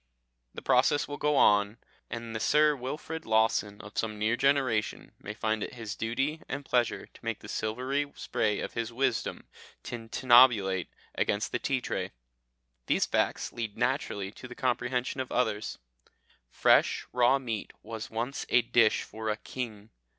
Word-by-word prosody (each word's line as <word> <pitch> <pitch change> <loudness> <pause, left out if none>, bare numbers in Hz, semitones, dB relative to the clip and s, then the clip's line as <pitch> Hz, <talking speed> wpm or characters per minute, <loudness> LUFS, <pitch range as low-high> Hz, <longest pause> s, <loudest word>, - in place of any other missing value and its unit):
The - - -7
process 145 - +3
will 145 - -5
go 150 0 +2
on, 105 -3 +4 0.3
and 115 -1 -6
the - - -1
Sir 150 +5 +4
Wilfrid 150 +5 -5
Lawson 110 -2 +1
of 105 0 -6
some 110 -1 -2
near 110 +3 +1
generation 130 -5 +1
may - - -7
find 110 0 -1
it - - -5
his 115 -2 -6
duty 135 +8 -1
and 140 - -4
pleasure 120 -3 +1
to - - -19
make 115 -2 -2
the - - -10
silvery 130 +6 -2
spray 105 -2 -1
of - - -5
his 115 0 -3
wisdom 125 -1 -1 0.4
tintinnabulate 115 -5 +4 0.3
against 105 +3 0
the 125 - -1
tea 135 0 0
tray. - - -3 0.7
These - - +3
facts - - 0
lead 110 -3 -5
naturally 120 -6 -1
to 125 - -11
the 125 - -10
comprehension 125 +1 -1
of 130 - -6
others. 110 -4 -1 0.7
Fresh - - +3
raw 125 +2 +4
meat 115 -6 -4
was 110 0 -6
once 120 +5 -3
a 120 - +4
dish 115 -1 +3
for 110 0 -5
a 105 - 0
king. 110 -2 -7
115 Hz, 160 wpm, -29 LUFS, 110-130 Hz, 0.7 s, on